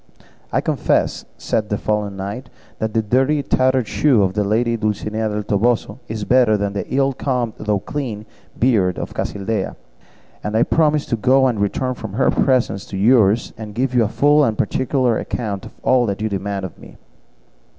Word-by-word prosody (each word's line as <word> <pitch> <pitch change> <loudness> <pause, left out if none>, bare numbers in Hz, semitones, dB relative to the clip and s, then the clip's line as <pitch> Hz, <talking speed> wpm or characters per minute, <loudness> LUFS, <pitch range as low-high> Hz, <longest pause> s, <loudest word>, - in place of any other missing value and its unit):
"I - - +1
confess," - - 0
said 105 - -2
the 105 - 0
fallen 105 -2 -2
knight, 100 +7 -6 0.3
"that 110 -1 -3
the 110 - +2
dirty 135 +7 +2
tattered 130 -3 +2
shoe 130 -9 +3
of 95 -1 0
the 105 +1 0
lady 115 +3 +1
Dulcinea 110 0 -2
del 105 0 -3
Toboso 110 +2 0
is 110 -1 -4
better 120 -1 +4
than 100 0 -2
the 100 - -5
ill 135 +1 +2
combed 125 -4 -2
though 105 -1 0
clean 110 -1 -5 0.3
beard 105 -8 +2
of - - -5
Casildea; 105 +2 -3 0.7
and 105 +1 -1
I 115 - +5
promise 155 -1 +2
to - - -1
go 130 +4 +3
and 120 -5 +1
to - - -1
return 125 +5 -1
from 110 -5 -8
her 125 - +2
presence 125 -7 +1
to 95 - -5
yours, 110 0 +3
and 105 -2 -8
to - - -5
give 130 -1 0
you 120 -2 +4
a - - +1
full 145 +6 +3
and 110 -5 0
particular 125 +1 +1
account 100 -5 -4
of - - -15
all 125 -3 +3
you 105 +2 -3
demand 100 -1 -3
of 95 - -10
me." - - -14
110 Hz, 190 wpm, -20 LUFS, 105-130 Hz, 0.7 s, I